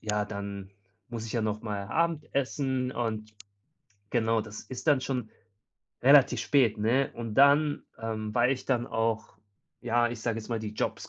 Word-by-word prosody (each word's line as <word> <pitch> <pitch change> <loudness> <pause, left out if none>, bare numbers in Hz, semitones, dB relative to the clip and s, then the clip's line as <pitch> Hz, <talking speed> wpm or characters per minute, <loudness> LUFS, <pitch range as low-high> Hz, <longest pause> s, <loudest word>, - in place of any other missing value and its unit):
ja, 105 -1 -1
dann 100 -1 -6 0.4
muss 115 -2 -5
ich 110 - -6
ja 115 - 0
nochmal 105 -2 -3
Abendessen 140 -5 -1
und 110 -3 -3 0.8
genau, 115 -2 +2
das 105 0 -8
ist 130 +4 -8
dann 145 -3 +5
schon 125 -4 -2 0.7
relativ 140 +1 +6
spät, 125 -7 +3
ne? 120 +6 +2
Und 115 -2 -5
dann 145 +2 +5 0.2
ähm, 110 -1 -3
weil 125 +2 +4
ich 130 - -5
dann 120 -3 0
auch, 115 -3 -2 0.4
ja, 120 0 +2
ich 120 -1 -6
sage 115 -1 -1
jetzt 110 - -9
mal, 115 -2 -2
die 105 -1 -5
Jobs - - -3
115 Hz, 160 wpm, -29 LUFS, 110-130 Hz, 0.8 s, relativ